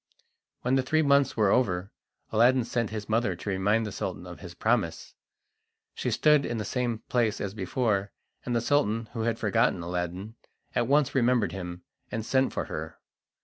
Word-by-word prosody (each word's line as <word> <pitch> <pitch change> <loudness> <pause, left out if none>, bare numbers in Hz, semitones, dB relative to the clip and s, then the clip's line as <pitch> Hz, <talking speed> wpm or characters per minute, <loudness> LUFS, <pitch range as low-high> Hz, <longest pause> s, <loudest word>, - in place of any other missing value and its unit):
When 125 - +1
the 135 - +4
three 155 +5 +2
months 140 -3 +3
were 105 -3 +4
over, 95 -6 +1 0.4
Aladdin 120 +3 +4
sent 115 -1 -1
his 105 -1 -5
mother 110 -4 +1
to 95 - -6
remind 105 +4 +1
the 105 - -4
Sultan - - -4
of - - -9
his - - -10
promise. - - 0 0.8
She - - -2
stood 150 -2 +4
in 120 -2 -2
the 105 - -3
same 120 -3 -2
place 115 -4 +1
as 100 -1 -3
before, 100 0 -1 0.3
and 120 - -2
the 115 - +2
Sultan, 115 -5 +1
who 115 - -3
had 115 0 0
forgotten 95 -4 +1
Aladdin, 90 +5 -4 0.4
at 120 - +1
once 145 +1 +3
remembered 120 -7 +2
him, 90 -1 -6 0.3
and 110 -1 -3
sent 130 +1 +2
for - - -3
her. - - -6
115 Hz, 180 wpm, -28 LUFS, 100-125 Hz, 0.8 s, the